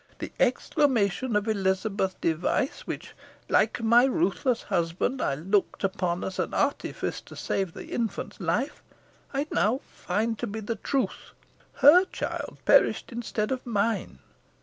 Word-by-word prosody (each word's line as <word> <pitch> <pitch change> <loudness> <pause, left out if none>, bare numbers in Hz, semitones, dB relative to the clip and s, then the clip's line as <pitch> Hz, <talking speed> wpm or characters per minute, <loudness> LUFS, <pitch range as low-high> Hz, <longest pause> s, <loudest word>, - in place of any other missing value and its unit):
The - - -6
exclamation 250 -4 +2
of 210 +1 +1
Elizabeth 195 -1 0
Device, 170 - 0
which, - - -6 0.4
like 230 - +2
my 235 +3 +6
ruthless 235 +2 +1
husband, 185 +7 -1
I 135 - +1
looked 190 +9 0
upon 185 -3 -1
as 190 - -4
an - - -1
artifice - - -1
to - - -13
save 190 -4 -2
the - - -7
infant's 230 -3 -3
life, 200 - -1 0.5
I 280 +1 -1
now 215 - +2
find 215 +4 -2
to 240 - -2
be 220 +1 -5
the 220 +1 -4
truth. 250 -1 -2 0.4
Her 345 +7 +7
child - - -5
perished - - +4
instead 230 -2 -2
of 260 -1 -2
mine. 210 - -1
215 Hz, 140 wpm, -27 LUFS, 190-245 Hz, 0.5 s, Her